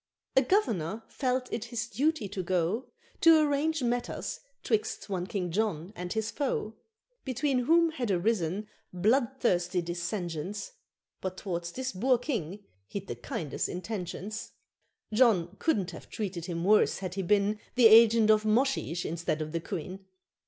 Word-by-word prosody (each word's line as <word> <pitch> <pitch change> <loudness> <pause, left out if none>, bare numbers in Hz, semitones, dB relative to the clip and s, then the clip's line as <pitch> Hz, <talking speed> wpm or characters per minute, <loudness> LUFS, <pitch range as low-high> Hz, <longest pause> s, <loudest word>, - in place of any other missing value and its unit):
A 265 - +7
Governor 225 - 0
felt 255 -1 -1
it 230 0 -2
his 240 -1 -3
duty 260 +1 0
to 195 -1 -3
go 185 +6 0 0.3
To 330 -1 +8
arrange 300 0 +1
matters 240 0 -2 0.2
'twixt 430 - -1
one 180 -1 -2
King 180 -4 -3
John 195 -2 -1
and 180 0 -5
his 220 0 -1
foe, 255 -6 -2 0.5
Between 260 -1 0
whom 335 +2 +4
had 255 -8 -3
arisen 195 0 0 0.2
bloodthirsty 200 -3 +1
dissensions, 175 - -4 0.5
But 185 0 -4
t'wards 170 -3 -4
this 260 +5 -3
Boer 250 +7 +2
King 210 - -4 0.2
he'd 200 -1 -5
the 120 - -5
kindest 120 +5 -3
intentions. 200 +2 -5 0.6
John 205 -7 +3
couldn't 195 - +1
have 165 - -11
treated 185 -6 -4
him 170 -2 -3
worse 210 +3 +4
had 185 -2 -5
he 195 - -2
been 205 +3 +2 0.2
The 250 -2 +5
agent 225 0 +8
of 215 0 +4
Moshesh 215 -6 +1
instead 165 -1 -2
of 155 0 -4
the 165 - -1
Queen. 190 +2 -6
210 Hz, 145 wpm, -29 LUFS, 180-245 Hz, 0.6 s, To